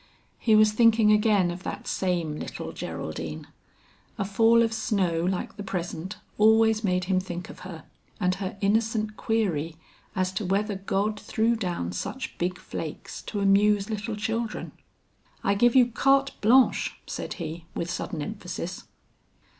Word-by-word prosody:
He 220 -2 +4
was 215 0 +6
thinking 220 -1 +5
again 210 -4 +3
of 175 +1 -7
that - - -6
same 175 -5 -1
little - - -6
Geraldine; 80 0 -5 0.7
a 195 - -1
fall 225 +4 +4
of 225 -1 0
snow 190 -7 0
like 185 +1 -2
the 205 - -5
present 180 0 -4 0.2
always 220 0 +5
made 180 -2 +1
him 185 0 +1
think 180 -1 -6
of - - -13
her 175 -4 -9 0.4
and 180 -2 +2
her 195 +1 -4
innocent 215 +1 +1
query 170 -10 -1 0.4
as 185 -1 0
to 190 +3 -3
whether 200 +3 0
God 200 +2 -1
threw 225 +3 +1
down 175 - -2
such 260 - -5
big 180 +1 -1
flakes - - -6
to 205 - -4
amuse 200 +1 +3
little 215 +1 -3
children. 225 +1 -3 0.7
"I 200 - +3
give 240 +5 +3
you 255 -2 +8
carte 275 +3 +3
blanche," 250 +4 +4
said - - -5
he 165 -1 -6
with 170 - -2
sudden 155 -3 -3
emphasis. 180 -2 -6
200 Hz, 150 wpm, -26 LUFS, 180-220 Hz, 0.7 s, you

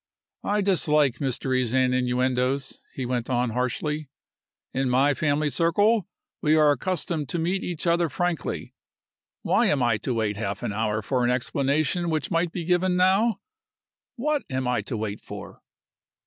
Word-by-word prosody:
"I 205 +1 +1
dislike 150 -9 +2
mysteries 130 -2 0
and 130 -1 +3
innuendoes," 125 +1 0 0.2
he 130 - -3
went 120 -1 -2
on, 125 -1 +1
harshly. 130 +5 -2 0.6
"In 135 0 0
my 135 +3 +3
family 145 +1 0
circle 205 +6 +2 0.3
we 155 +1 +3
are 150 -2 +5
accustomed 165 -3 -2
to 170 - -2
meet 180 +4 -1
each 175 -2 -3
other 170 -1 +2
frankly. 175 +3 -3 0.7
Why - - +3
am 135 -4 +2
I 120 -3 +2
to 120 +3 -3
wait 105 -3 -1
half 100 -2 -3
an - - -2
hour 110 0 -1
for 125 +3 0
an 120 - +2
explanation 140 +7 0
which 155 +2 -2
might 165 0 +1
be 170 -2 -4
given 180 +1 +2
now? 195 +4 +3 0.7
What 295 +4 0
am 130 -1 -2
I 125 0 +1
to 115 - -3
wait 105 -1 -4
for?" - - -10
140 Hz, 160 wpm, -25 LUFS, 125-170 Hz, 0.7 s, are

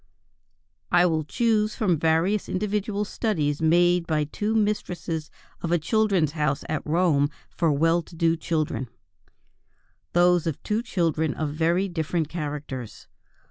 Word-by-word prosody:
I 175 0 +5
will 160 -3 +1
choose 215 +5 +1
from 180 -8 +1
various 165 +6 +1
individual 210 +1 -1
studies 155 -10 -1
made 175 +1 +3
by 155 -2 +1
two 210 +9 -2
mistresses 175 -7 -1 0.3
of 170 - -3
a 175 - +4
Children's 190 -2 +1
House 150 -2 -1
at 155 -1 -2
Rome 155 -3 +2 0.2
for 165 -2 +1
well 165 +4 +2
to 170 - -15
do 165 0 +2
children, 155 -6 -2 1.2
those 175 -1 +4
of 160 - -3
two 215 +2 0
children 165 - 0
of 155 -2 -2
very 170 +5 +1
different 165 -2 -2
characters. 145 -7 -6
165 Hz, 135 wpm, -25 LUFS, 155-190 Hz, 1.2 s, I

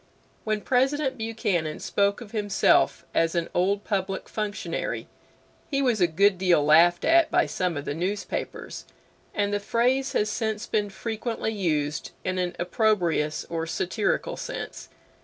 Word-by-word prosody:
When 215 -1 0
President 265 +3 +1
Buchanan 195 -8 -1
spoke 200 +2 0
of 220 -3 -10
himself 205 -3 +2
as 165 +1 +2
an 170 -1 0
Old 200 +3 +1
Public 195 -2 -2
Functionary 210 -1 -3 0.6
he 275 - 0
was 245 -7 +1
a 175 - +6
good 190 +3 +3
deal 175 -6 +3
laughed 170 +3 +5
at 335 0 +5
by - - +3
some 180 -4 -2
of 145 - -5
the - - -2
newspapers, 185 +6 -4 0.5
and 205 0 0
the 205 - +1
phrase 250 +6 +1
has 210 - +2
since 220 0 -2
been 210 -1 0
frequently 225 +2 -3
used 150 -7 -1
in 185 0 -1
an 180 -1 -1
opprobrious 175 -5 +1
or 165 -1 -3
satirical 205 - -1
sense. - - -6
200 Hz, 145 wpm, -26 LUFS, 175-220 Hz, 0.6 s, a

